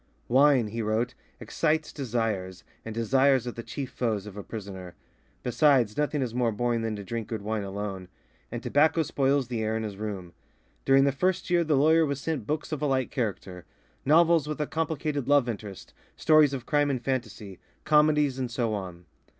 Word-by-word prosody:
"Wine," 130 -3 +4
he 115 +2 -4
wrote, 110 +3 -1 0.3
"excites 155 +7 -1
desires, 110 - -3 0.2
and 115 -1 -7
desires 130 +2 +3
are 120 - -3
the 115 - -7
chief 135 +2 -6
foes 110 -5 -2
of 105 -2 -9
a 105 - -6
prisoner; 95 -4 -8 0.5
besides, 125 -4 +3
nothing 150 -1 0
is 120 -3 -4
more 120 -2 +1
boring 120 +2 -1
than 110 -1 -2
to 100 - -7
drink 115 +2 -5
good 110 -3 -5
wine 110 0 -2
alone," 100 -1 -5 0.4
and - - -5
tobacco 155 +3 +3
spoils 140 -2 +1
the 120 -2 -3
air 110 0 -1
in 110 - -3
his 105 -3 -6
room. 100 -5 -6 0.5
During 135 0 +5
the 140 - +3
first 180 +5 -1
year 175 -1 +4
the 155 -3 +1
lawyer 160 +4 +5
was 140 -3 -1
sent 145 -7 -3
books 155 +1 -3
of 150 -2 -3
a 150 - +1
light 130 -2 0
character; 95 - -4 0.4
novels 165 +1 +4
with 150 0 -4
a 150 - 0
complicated 155 -3 -2
love 145 -3 +4
interest, 105 -4 -7 0.2
stories 155 -2 +5
of 130 -3 -5
crime 145 -1 +2
and 135 -3 -1
fantasy, 110 -7 -4 0.3
comedies, 150 -3 +3
and 125 -2 -2
so 115 -2 -1
on. 90 -4 -6
125 Hz, 190 wpm, -27 LUFS, 110-145 Hz, 0.5 s, During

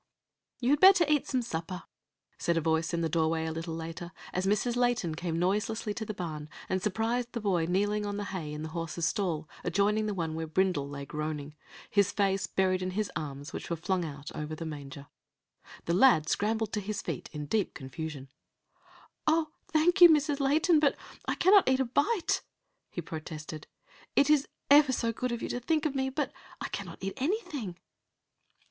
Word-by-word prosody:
"You 250 +2 +2
had 290 - +4
better 375 -1 +8
eat 300 -2 +2
some 255 -2 0
supper," 175 -3 -4 0.6
said 170 -1 +1
a - - +4
voice 160 0 +1
in 170 -1 -1
the 165 - +1
doorway 160 0 +1
a 160 - -2
little 165 +1 -4
later, 165 +1 -6 0.2
as 185 +1 0
Mrs. 215 +4 +1
Layton 245 -9 +1
came 165 0 -3
noiselessly 210 +4 0
to 220 +1 -4
the 215 - -4
barn, 155 -4 -5 0.2
and 185 0 0
surprised 225 +5 -1
the 235 - -2
boy 185 -6 +1
kneeling 205 +3 +1
on 205 0 -3
the 205 - -2
hay 160 -5 -4
in 150 +1 -5
the 160 - -4
horse's 165 0 -3
stall 170 -6 -1 0.2
adjoining 210 +2 +2
the 210 - -2
one 165 -3 -2
where 160 0 -3
Brindle 155 -4 +1
lay 140 -1 -6
groaning, 150 0 -4 0.3
his 200 -1 +3
face 195 -1 +1
buried 185 -1 +1
in 185 - -1
his 215 -1 0
arms, 145 -2 -5
which - - -6
were 170 - 0
flung 180 +2 -1
out 145 -2 -7
over 150 +1 -4
the 165 - -6
manger. 140 -2 -7 0.8
The 170 - 0
lad 180 -6 +5
scrambled 220 +3 0
to 210 - 0
his 205 +1 -4
feet - - -4
in 150 -2 -5
deep 200 +6 0
confusion. 140 0 -6 1.0
"O, 315 0 +3 0.2
thank 350 +4 +3
you, 350 - +12
Mrs. 295 -2 +3
Layton, 310 +4 +4
but 290 -2 +3 0.3
I - - +1
cannot 380 -3 +6
eat 260 0 +3
a 265 - +2
bite!" 330 - +1 0.5
he 175 - -4
protested. 155 -1 -7 0.5
"It 285 +1 +5
is 290 -2 +4 0.2
ever 290 -1 +8
so 230 -2 0
good 250 +2 -2
of 235 - -3
you - - -3
to 245 - -2
think 310 +5 0
of 300 - +1
me, 265 -1 0
but 290 +3 -2 0.3
I - - -4
cannot - - -6
eat 195 0 -2
anything." 280 - -2
190 Hz, 195 wpm, -30 LUFS, 160-245 Hz, 1.0 s, you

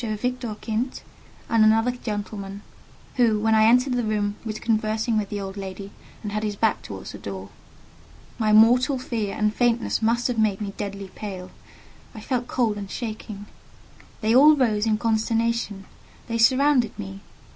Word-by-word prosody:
Victor 235 +1 -3
Kint, 230 +4 -3 0.4
and 225 -1 +4
another 225 +3 +4
gentleman, 205 -4 -6 0.5
who, 225 -4 +3
when 220 +1 +2
I 220 0 +5
entered 250 +3 +4
the 245 -1 0
room, 210 -1 -1
was 215 -1 -4
conversing 220 +1 0
with 210 -2 0
the 205 - -3
old 195 0 -6
lady, 195 0 -7 0.3
and 210 - -4
had 210 +1 -2
his 210 -1 -2
back 220 +1 +1
towards 95 -2 -8
the - - -9
door. 95 -1 -7 0.9
My 215 -1 +2
mortal 245 +6 +5
fear 225 -5 -3
and 210 0 +1
faintness 240 -1 +1
must 235 +2 +2
have 245 -3 -2
made 210 -3 +2
me 200 -2 -4
deadly 200 -1 -6
pale. 185 -3 -7 0.6
I - - -7
felt 245 +2 -2
cold 225 -5 0
and 200 -1 -6
shaking. 215 -3 -6 0.8
They 220 +1 +2
all 300 +4 +8
rose 225 -6 +1
in 215 -1 +2
consternation; 225 -2 0 0.4
they 230 -1 -2
surrounded 260 0 +3
me. 195 -2 -7
220 Hz, 165 wpm, -24 LUFS, 205-235 Hz, 0.9 s, all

